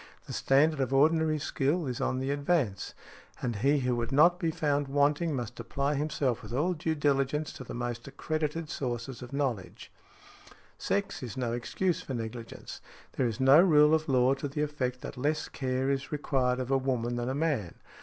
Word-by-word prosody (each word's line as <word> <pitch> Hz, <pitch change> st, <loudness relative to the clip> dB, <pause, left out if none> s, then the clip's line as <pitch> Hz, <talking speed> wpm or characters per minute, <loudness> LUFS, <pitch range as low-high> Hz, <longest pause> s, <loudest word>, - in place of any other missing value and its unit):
The -, -, -7 dB
standard 145 Hz, +3 st, +3 dB
of 135 Hz, -1 st, 0 dB
ordinary 155 Hz, +2 st, +3 dB
skill 150 Hz, +3 st, 0 dB
is 125 Hz, -3 st, -3 dB
on 130 Hz, -, 0 dB
the 135 Hz, +1 st, -1 dB
advance; 140 Hz, -, 0 dB, 0.4 s
and 120 Hz, -4 st, -2 dB
he 140 Hz, +6 st, +2 dB
who 125 Hz, -1 st, +1 dB
would 120 Hz, +2 st, -2 dB
not 170 Hz, +6 st, +5 dB
be 170 Hz, -4 st, 0 dB
found 145 Hz, -2 st, 0 dB
wanting 145 Hz, +3 st, +2 dB
must 120 Hz, -1 st, -5 dB
apply 140 Hz, +5 st, -1 dB
himself 140 Hz, -4 st, -1 dB
with 110 Hz, 0 st, -9 dB
all 160 Hz, +8 st, +1 dB
diligence 150 Hz, -2 st, 0 dB
to -, -, -8 dB
the -, -, -8 dB
most 120 Hz, 0 st, -4 dB
accredited 155 Hz, +3 st, -3 dB
sources 125 Hz, -3 st, -4 dB
of 125 Hz, -, -9 dB
knowledge. 130 Hz, -9 st, -3 dB, 0.9 s
Sex 200 Hz, 0 st, -1 dB
is 125 Hz, -3 st, -6 dB
no 120 Hz, -2 st, -1 dB
excuse 170 Hz, +9 st, -1 dB
for 130 Hz, -, -5 dB
negligence; 115 Hz, 0 st, -7 dB, 0.3 s
there 130 Hz, -, 0 dB
is 115 Hz, +1 st, -4 dB
no 135 Hz, +4 st, +7 dB
rule 150 Hz, -4 st, +6 dB
of 155 Hz, -1 st, +1 dB
law 130 Hz, 0 st, +4 dB
to 140 Hz, +1 st, -4 dB
the 150 Hz, +2 st, -2 dB
effect 130 Hz, -4 st, -2 dB
that -, -, -7 dB
less 150 Hz, +4 st, 0 dB
care 130 Hz, 0 st, -2 dB
is 135 Hz, 0 st, -3 dB
required 130 Hz, -4 st, 0 dB
of 130 Hz, +1 st, -3 dB
a 135 Hz, -, +4 dB
woman 120 Hz, -2 st, -1 dB
than 120 Hz, +1 st, -2 dB
a 130 Hz, -, -2 dB
man. 140 Hz, -, -1 dB
135 Hz, 185 wpm, -29 LUFS, 125-150 Hz, 0.9 s, no